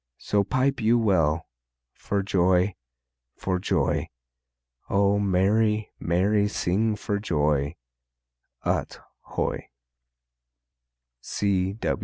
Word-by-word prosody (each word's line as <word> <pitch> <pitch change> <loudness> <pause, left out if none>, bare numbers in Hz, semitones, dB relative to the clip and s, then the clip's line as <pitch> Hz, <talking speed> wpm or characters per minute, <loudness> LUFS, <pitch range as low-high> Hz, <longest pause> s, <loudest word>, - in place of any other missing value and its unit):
So 100 -1 +1
pipe 130 +4 0
you 115 +2 +4
well, 85 -8 +2 0.5
For 100 -1 -2
joy, 95 0 +2 0.6
for 95 -1 -2
joy! - - 0 0.8
O 100 +1 +3
merry, 105 +3 +2
merry 100 +4 +2
sing 105 +2 0
for 105 0 -2
joy, 75 -5 0 0.9
Ut - - -1 0.2
hoy! - - -3
100 Hz, 80 wpm, -25 LUFS, 90-105 Hz, 0.9 s, you